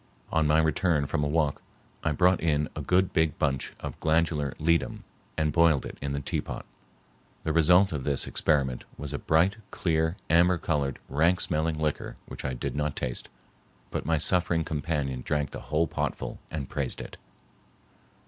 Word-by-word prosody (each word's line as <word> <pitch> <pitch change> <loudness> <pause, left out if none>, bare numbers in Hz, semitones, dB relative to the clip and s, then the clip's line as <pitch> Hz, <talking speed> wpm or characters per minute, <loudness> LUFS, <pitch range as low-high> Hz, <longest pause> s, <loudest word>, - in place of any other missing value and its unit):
On 80 -2 +2
my 75 +1 +4
return 80 -1 +2
from 75 - -1
a - - +1
walk 75 -1 +1 0.4
I 80 - +1
brought 90 +5 +3
in 75 -2 +1
a - - -3
good 90 +1 +2
big 80 -1 +2
bunch 70 -4 -1
of - - -6
glandular 80 -3 +1
ledum 85 +2 +1 0.3
and 75 -1 +1
boiled 85 -4 +4
it - - -8
in 70 -1 -2
the 70 - -1
teapot. 70 - -4 0.8
The 80 - 0
result 90 +4 +5
of 70 -3 -3
this 70 -1 0
experiment 65 -5 0
was 75 0 -6
a 70 - -2
bright, 85 +7 +3
clear 80 0 0
amber 85 +2 +4
colored, 70 -5 -1
rank 80 +6 +2
smelling 80 -2 0
liquor 75 -1 -2
which - - -8
I 65 -2 -2
did 60 - -4
not 75 0 -1
taste, - - -4 0.6
but - - -2
my 80 +2 +1
suffering 85 +1 +2
companion 75 -4 -2
drank 75 -3 -1
the - - -6
whole 80 +2 +3
potful - - -3
and 70 -4 -4
praised 70 -3 -3
it. - - -8
80 Hz, 170 wpm, -28 LUFS, 70-85 Hz, 0.8 s, result